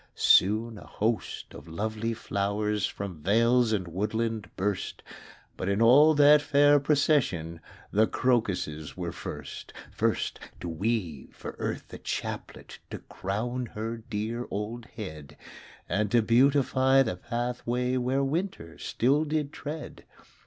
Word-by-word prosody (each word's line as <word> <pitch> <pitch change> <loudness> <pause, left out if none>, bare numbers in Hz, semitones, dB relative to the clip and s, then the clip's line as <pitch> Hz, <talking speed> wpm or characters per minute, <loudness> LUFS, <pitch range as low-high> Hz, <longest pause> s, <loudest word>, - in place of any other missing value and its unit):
Soon 110 +3 +4
a - - -13
host 110 +1 -2
of - - -11
lovely 110 +6 -3
flowers 105 0 -1
From 95 -6 -7
vales 115 +6 +3
and 95 -5 -1
woodland 110 +4 -2
burst; 100 0 -2 0.5
But 95 - -3
in 100 +1 +1
all 140 +7 +7
that 145 +1 +7
fair 145 0 +5
procession 135 - +1 0.3
The 110 +2 +4
crocuses 95 -12 -1
were 85 -2 -3
first. - - -8 0.2
First - - -1 0.2
to - - -6
weave 85 - -3
for - - -8
Earth - - -4
a - - -7
chaplet - - -5
To - - -5
crown 120 +6 -4
her 115 +2 -3
dear 115 +2 -4
old 110 +4 -4
head; 75 - -9 0.5
And 105 0 0
to 115 +2 +3
beautify 130 +2 +4
the 110 -8 -2
pathway 120 +2 -2
Where 130 +2 +1
winter 150 - -3
still 140 +6 +1
did 155 -1 -2
tread. 150 +1 -7
115 Hz, 130 wpm, -28 LUFS, 100-130 Hz, 0.5 s, all